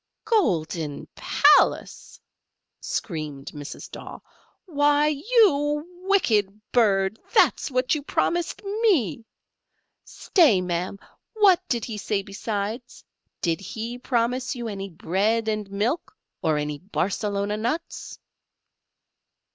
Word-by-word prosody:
"Golden 165 - 0
palace!" - - +3 0.6
screamed 150 -4 -4
Mrs. 145 -1 -9
Daw: - - -8 0.5
"why, 295 -3 +3
you 295 - +2 0.2
wicked 215 - +2
bird, 200 -3 +2 0.2
that's - - +4
what 255 -1 +1
you 300 - -1
promised 340 +6 -1
me. 385 - +1 0.8
Stay, 300 - +3
ma'am, 180 +1 -2 0.4
what 400 -5 +5
did 235 -3 0
he 220 -3 -5
say 200 -1 -1
besides? 210 +4 -5 0.4
did 165 -1 0
he 225 +5 -6
promise 250 +1 0
you 240 -2 -5
any 195 -2 -5
bread 205 +7 0
and 215 -2 -2
milk, 220 - -2 0.2
or 155 -2 +1
any 150 0 -3
Barcelona 200 +2 -2
nuts?" 240 +10 -4
225 Hz, 100 wpm, -24 LUFS, 195-295 Hz, 0.8 s, what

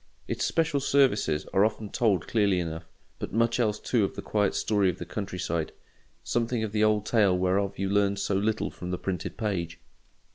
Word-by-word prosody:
Its - - -2
special 160 -3 +1
services 125 - +2
are 95 - +4
often 110 0 0
told 105 -4 +1
clearly 100 -5 +2
enough; 80 -1 -5 0.3
but - - -5
much 115 +3 +1
else 105 -3 +1
too 120 -4 +1
of 95 - -2
the - - -5
quiet 105 -2 0
story 100 -3 +2
of 90 - -3
the 85 - -6
country 95 0 -5
side: 85 -3 -2 0.5
something 115 -1 -1
of 110 - -3
the 105 0 +1
old 105 -1 +2
tale 105 -5 +3
whereof 95 +2 0
you 95 - -1
learn 100 0 +2
so 100 0 -1
little 105 +3 0
from 90 - -7
the 90 - -2
printed 90 -3 -4
page. 85 -7 -2
100 Hz, 195 wpm, -27 LUFS, 90-110 Hz, 0.5 s, are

